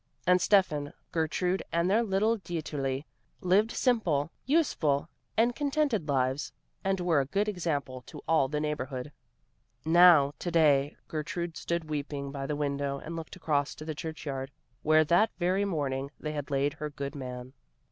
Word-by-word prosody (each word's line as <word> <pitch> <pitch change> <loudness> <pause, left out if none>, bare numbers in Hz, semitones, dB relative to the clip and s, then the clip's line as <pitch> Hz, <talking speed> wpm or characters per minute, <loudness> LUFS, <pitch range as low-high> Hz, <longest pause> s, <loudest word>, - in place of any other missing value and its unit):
And 180 +1 +5
Steffan, 155 -9 +2 0.2
Gertrude 180 +3 0
and 170 +2 +1
their 210 +5 +4
little 215 +1 +1
Dieterli 145 -6 -3 0.3
lived 195 +4 +3
simple, 175 - +1 0.2
useful 170 - +2 0.3
and 235 +2 +3
contented 285 - 0
lives 130 - 0 0.3
and 195 -1 0
were 175 -4 +2
a 135 - 0
good 200 +8 0
example 150 -9 -2
to - - -9
all 160 -5 +3
the 150 +2 -2
neighborhood. 145 -3 -3 0.7
Now, 165 -4 +7
to 175 - -3
day, 150 -4 +3
Gertrude 165 +2 -4
stood 170 -2 -2
weeping 145 -2 -4
by 135 -1 -4
the 150 - -1
window 140 -1 -1
and 165 +4 -7
looked 165 -1 -7
across 150 -5 0
to 155 - -9
the 155 - -3
church 160 +1 -6
yard, 135 -2 -3 0.3
where 155 +1 +5
that 175 +8 +4
very 185 +3 +1
morning 140 -7 -2
they 150 - -4
had 145 -1 -4
laid 140 +1 +1
her 150 -1 -5
good 140 -1 -5
man. 125 -2 -7
155 Hz, 160 wpm, -29 LUFS, 140-180 Hz, 0.7 s, Now